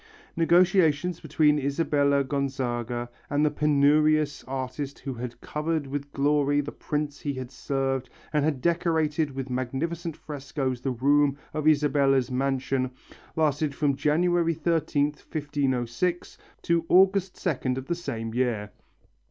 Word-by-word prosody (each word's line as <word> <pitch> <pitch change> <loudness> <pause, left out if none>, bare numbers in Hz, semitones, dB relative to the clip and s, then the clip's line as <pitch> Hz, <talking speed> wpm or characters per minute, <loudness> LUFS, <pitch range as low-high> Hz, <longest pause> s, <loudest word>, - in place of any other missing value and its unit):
Negotiations 175 -1 +3
between 150 -1 +2
Isabella 140 0 +1
Gonzaga 125 -3 -2 0.2
and 145 +1 +2
the 150 - +2
penurious 150 0 +3
artist 135 +2 -4
who 135 - -5
had 120 0 -7
covered 150 0 -2
with 140 +1 -5
glory 145 0 +2
the 145 0 -3
prince 150 -1 -3
he 145 -2 -3
had 130 -1 -6
served 135 -1 -2 0.2
and 150 -1 +2
had 145 -4 0
decorated 160 -3 +1
with 135 -1 -4
magnificent 155 +7 -3
frescoes 140 -4 -4
the 135 - -1
room 140 +3 +2 0.2
of 155 0 -1
Isabella's 140 -4 +3
mansion, 130 0 0 0.5
lasted 150 -2 +1
from 140 -2 +1
January 165 +4 +2
13th, 150 -2 0
1506, 145 +2 -1 0.3
to 170 -1 +2
August 190 0 +4
2nd 130 -7 -1
of 130 - -5
the 170 - -1
same 115 -10 -5
year. 115 -4 -1
145 Hz, 125 wpm, -26 LUFS, 135-155 Hz, 0.5 s, August